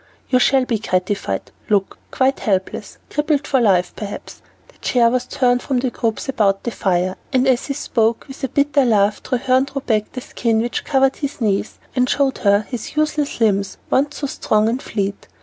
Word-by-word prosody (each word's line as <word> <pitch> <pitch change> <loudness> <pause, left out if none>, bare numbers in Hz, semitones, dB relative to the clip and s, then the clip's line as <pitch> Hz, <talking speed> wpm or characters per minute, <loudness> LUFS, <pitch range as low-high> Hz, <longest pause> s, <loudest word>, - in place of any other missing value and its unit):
"You 255 - +5
shall 265 0 +3
be 230 -3 -1
gratified; 185 - -2 0.2
look, 200 -2 +1
quite 265 +1 +1
helpless, 190 -3 -2
crippled 295 -1 0
for 265 -2 +2
life, 185 -5 +3
perhaps." 205 -1 -7 0.3
The - - -24
chair 235 -2 +3
was 250 0 -1
turned 245 -1 +2
from 265 - -1
the 250 0 0
groups 230 +1 -2
about 200 -7 +1
the 235 - -2
fire, 185 -2 0
and 260 -1 +2
as 255 -2 +2
he 275 - -2
spoke, 230 -5 0
with 270 0 -11
a - - +2
bitter 280 +2 +2
laugh 210 -3 +2
Treherne 260 +1 +1
threw 275 0 -5
back 215 -4 0
the 255 - -5
skin 230 -2 0
which 240 +2 -2
covered 270 -2 +2
his 285 -1 -4
knees, 210 -3 -1 0.2
and 250 -1 +2
showed 275 -1 +1
her 200 0 +3
the 245 -4 -5
useless 300 -3 0
limbs 200 -4 +1
once 285 +2 +1
so 290 - -3
strong 215 -5 +1
and 240 +4 -1
fleet. 200 -2 -3
245 Hz, 190 wpm, -20 LUFS, 210-270 Hz, 0.3 s, You